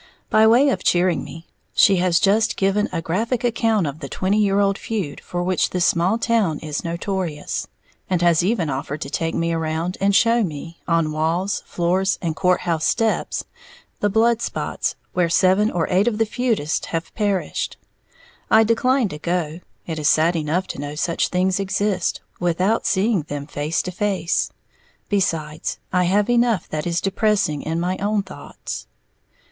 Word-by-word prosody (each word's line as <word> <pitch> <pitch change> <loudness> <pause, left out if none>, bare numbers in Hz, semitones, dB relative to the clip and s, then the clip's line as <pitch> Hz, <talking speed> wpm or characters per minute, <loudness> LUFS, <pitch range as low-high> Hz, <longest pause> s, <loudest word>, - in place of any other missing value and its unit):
By 220 0 +6
way 250 +6 +5
of - - -1
cheering 175 0 +2
me, 165 +1 -10 0.3
she 195 -2 +5
has 180 -1 +3
just 210 +3 +2
given 195 +2 +1
a 165 -2 -3
graphic 225 +9 -1
account 225 -5 +1
of 145 +1 -4
the 140 -4 -7
twenty 195 +3 0
year 200 -1 +2
old 200 -1 +2
feud 200 -10 -4
for 175 0 -3
which 185 0 +1
this 180 -1 0
small 180 +6 +2
town 225 -9 +1
is 150 -1 -4
notorious, 170 -2 -3 0.4
and 185 -2 +1
has 170 -1 +4
even 190 -4 +1
offered 140 +2 -4
to 140 - -5
take 165 0 -1
me 165 0 0
around 165 +2 -2
and 200 0 +3
show 230 +3 +4
me, 165 -1 -6
on 165 -3 +1
walls, 165 +6 -1
floors 185 +2 0
and 165 -3 -2
court 180 0 +2
house 165 -3 -1
steps, 225 -2 0 0.6
the 205 - +1
blood 230 +3 +2
spots - - -2 0.2
where 175 -2 +1
seven 190 +5 +3
or 170 -5 -1
eight 190 +4 +3
of 225 -3 +1
the 225 - +2
feudists 220 -9 -1
have 165 0 -4
perished. 205 -4 -1 0.7
I 220 0 +6
declined 230 +1 +2
to 150 - -7
go, 170 -1 -2 0.3
it 160 -2 -4
is 150 - +2
sad 165 +3 +3
enough 165 +4 0
to - - -5
know 145 +1 -5
such 165 +2 0
things 185 +1 +1
exist, 195 -1 -1 0.2
without 180 +5 +1
seeing 205 0 +2
them 145 -1 -6
face 150 +2 -2
to 180 - -4
face. 190 -2 0 0.6
Besides, 165 -6 -1 0.2
I 180 -1 +3
have 200 +3 +2
enough 240 -5 +2
that 155 +2 -3
is 170 0 0
depressing 195 -6 +1
in 160 +1 -2
my 180 +2 -1
own 205 0 0
thoughts. 185 - -8
185 Hz, 175 wpm, -21 LUFS, 165-210 Hz, 0.7 s, By